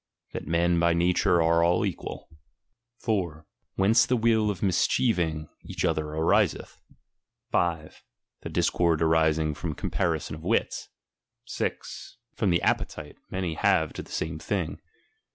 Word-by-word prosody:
That - - -6
men 85 +1 +2
by 85 0 +3
nature 85 0 +3
are 85 +1 +3
all 85 +1 +3
equal. - - -5 0.8
■* 85 -9 -1 0.3
Whence 105 +5 +4
the 125 - +2
will 110 -2 +3
of 100 - -3
mischieving 85 -4 +1
each - - -3
other 75 0 -1
ariseth. 80 +1 +1 0.7
5. 80 -3 -1 0.4
The - - -6
•discord 85 -2 +1
arising 80 -1 +2
from 75 +1 -4
comparison - - -2
of 80 - -12
wits. 110 +6 -1 0.6
6. - - -5 0.2
From 105 - +1
the 85 -1 +2
appeiile 75 -2 -1 0.2
Oiany 90 -3 -2
have 95 -6 +2
to - - -5
the - - -14
same 80 0 -3
thing. 95 -2 -3
85 Hz, 135 wpm, -27 LUFS, 80-95 Hz, 0.8 s, Whence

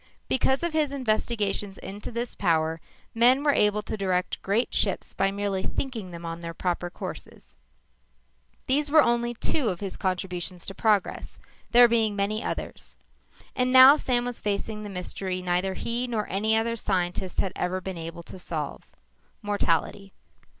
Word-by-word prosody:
Because 265 +3 +2
of 340 -2 -1
his 305 -3 +1
investigations 215 -6 -1
into 205 +4 -8
this 235 +1 -2
power, 160 -3 0 0.3
men 250 +4 +5
were 290 -1 +4
able 210 -2 +2
to - - -4
direct 185 -3 -1
great 210 +5 0
ships - - +1
by 195 - +1
merely 200 -1 -2
"thinking" 225 -4 -3
them 170 -1 -8
on 165 0 -5
their 170 -1 -7
proper 175 0 -2
courses. - - -9 1.1
These 285 +3 +2
were 310 0 +6
only 240 0 +1
two 265 +2 0
of 180 -4 -1
his 195 -2 -5
contributions 180 -1 -3
to 195 - -5
progress, 210 -1 0 0.3
there 240 0 +8
being 225 -3 +1
many 205 +2 -1
others. - - -5 0.6
And 250 0 +1
now, 260 +2 +10
Sam 245 -5 0
was 245 -1 -4
facing 210 +1 -2
the 210 - -6
mystery 185 0 -4
neither 180 +1 0
he 240 +4 -1
nor 220 -4 -2
any 215 +4 +2
other 230 +1 0
scientist 185 -3 -2
had 190 - 0
ever 185 +1 -1
been 190 0 -6
able 165 +1 -7
to 185 - -10
solve. 155 -5 -4 0.6
Mortality. 195 -1 -1
205 Hz, 160 wpm, -26 LUFS, 185-235 Hz, 1.1 s, now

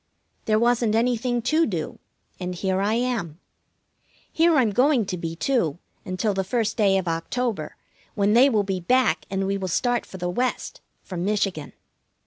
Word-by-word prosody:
There 215 -1 +2
wasn't 235 -1 +2
anything 240 +1 0
to 310 +6 +2
do, 170 -8 -4 0.4
and 180 -1 -4
here 190 +1 -1
I 210 +3 +1
am. 230 -10 -2 0.9
Here 330 0 +4
I'm 245 -7 +3
going 255 +1 +3
to 185 - -3
be, 165 -1 -5
too, 175 - 0 0.3
until 185 +3 -1
the 190 0 -1
first 220 +2 -1
day 200 -4 +3
of 185 -2 -2
October, 205 +8 -2 0.4
when 205 -1 +2
they 255 +4 +6
will 215 -5 +2
be 190 -1 -2
back, 220 -1 +2
and 195 0 -1
we 195 +1 -1
will 190 - -3
start 240 +7 0
for 190 - -9
the 180 -1 -3
West, 245 +8 -2 0.2
for 185 - -7
Michigan. 185 -5 -1
210 Hz, 170 wpm, -24 LUFS, 185-245 Hz, 0.9 s, they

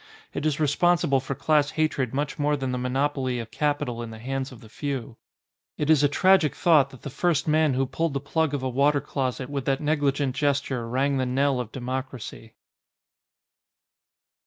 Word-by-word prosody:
It 155 - -1
is 150 -1 -1
responsible 150 -1 +3
for 135 +1 -4
class 150 0 +2
hatred 140 -6 0
much 145 +2 -3
more 145 0 +1
than 135 -2 -2
the 125 - -2
monopoly 130 0 -1
of 115 -1 -6
capital 145 -4 -1
in 115 - -6
the 110 - -9
hands 135 +3 -4
of 125 - -12
the 110 - -13
few. 135 0 -5 0.6
It 150 +1 +1
is 155 -3 +5
a 145 - +4
tragic 185 0 +4
thought 150 -5 +4
that 130 - -15
the 140 - -6
first 160 +1 0
man 155 -3 +3
who 135 +1 +1
pulled 145 +3 -2
the - - +1
plug 145 +1 0
of 135 - -4
a - - 0
water 140 +3 +3
closet 130 -2 -3
with 140 -2 -4
that 135 -1 +1
negli 145 -2 +1
gent 140 -2 -2
gesture 140 -4 -1
rang 135 +3 +1
the 130 -1 0
knell 135 +1 +1
of 120 -3 -5
democracy. 130 -3 -6
140 Hz, 190 wpm, -25 LUFS, 130-145 Hz, 0.6 s, is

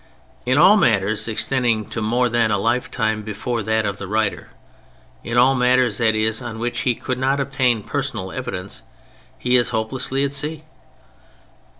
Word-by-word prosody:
In 130 +2 +2
all 185 +7 +7
matters 105 - +2
extending 115 -1 0
to 115 - -4
more 120 +3 +1
than 120 -1 +1
a 105 - +1
lifetime 110 0 -1
before 110 +3 -4
that 110 +1 0
of 100 -1 -3
the 100 - -6
writer, 105 0 -1 0.7
in 120 +1 -3
all 130 +2 +5
matters, 125 -3 +2
that 110 -1 +2
is, 110 +2 0
on 120 -2 -6
which 120 +1 -3
he 125 -2 +1
could 130 +2 -4
not 135 +2 +1
obtain 130 -5 0
personal 125 -10 -4
evidence, 90 +2 -5 0.6
he 125 0 +1
is 120 -1 +3
hopelessly 125 +4 -1
at 140 0 -1
sea. 150 +2 -2
120 Hz, 165 wpm, -21 LUFS, 110-130 Hz, 0.7 s, all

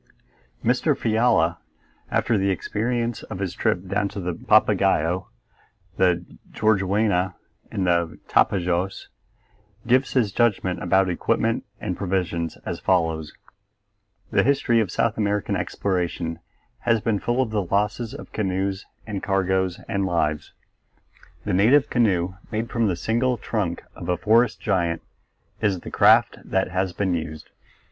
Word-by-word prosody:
Mr. - - +2
Fiala, 110 -7 +2 0.5
after 115 - +1
the 100 -1 +1
experience 115 +4 -1
of - - -7
his 95 -2 -3
trip 90 +1 0
down 100 +2 0
the 90 -3 -4
Papagaio, 85 +2 +2 0.7
the 90 -2 +2 0.3
Juruena, 100 -2 +1 0.4
and 95 - -1
the 85 -2 +1
Tapajos, 90 0 +1 0.8
gives 130 +2 +2
his 115 -6 +2
judgment 100 -5 +1
about 95 +1 +3
equipment 115 +5 0
and 95 -4 -3
provisions 90 -4 -2
as - - -4
follows: 80 -4 0 1.0
The 100 - +4
history 130 -1 +2
of 110 -5 0
South 115 +5 0
American 105 -1 0
exploration 85 -3 -2 0.4
has 115 -2 +2
been 105 -1 0
full 120 +5 -1
of 130 -4 +1
the 105 -2 +1
losses 105 +5 -1
of - - -10
canoes 95 -1 -2 0.2
and 100 -3 -4
cargoes 95 -2 0
and 100 -3 -1
lives. 75 -4 -1 0.9
The - - -1
native 120 +10 +4
canoe 95 -7 +2 0.2
made 110 +1 -3
from 115 -2 +1
the 90 - 0
single 120 +7 0
trunk 100 -6 -2
of 85 - -7
a 90 - +1
forest 115 +1 +3
giant 85 -6 0 0.6
is 95 -4 +1
the - - -8
craft - - +5
that 95 -1 -1
has 95 +1 0
been 95 +1 -1
used. 80 -2 -5
95 Hz, 135 wpm, -24 LUFS, 90-110 Hz, 1.0 s, craft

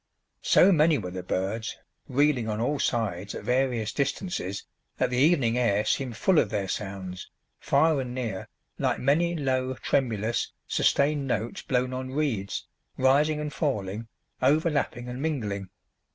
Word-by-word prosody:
So 195 - +6
many 155 -2 +4
were 90 - -5
the 90 0 -5
birds, 95 +5 -2 0.3
reeling 130 -4 +2
on 105 0 -2
all 140 +5 0
sides, 105 -6 -1
at - - -6
various 125 -4 0
distances, 140 - -2 0.3
that - - +1
the 125 - 0
evening 130 -5 +3
air 105 -4 +2
seemed 125 -4 -1
full 185 +3 +4
of 105 - +1
their 100 -2 -2
sounds, 95 -2 -5 0.3
far 150 0 +3
and 125 -1 -5
near, 115 -7 -3 0.3
like - - +1
many 170 +6 +2
low, 130 -3 0
tremulous, 115 -4 0
sustained 140 0 +2
notes 115 -2 -2
blown 125 0 0
on 130 0 -4
reeds, 120 -11 -1 0.3
rising 145 +4 +3
and 150 -1 -4
falling, 110 - -2 0.3
overlapping 145 -3 +1
and 125 +2 -5
mingling. 105 - -2
125 Hz, 145 wpm, -27 LUFS, 105-145 Hz, 0.3 s, So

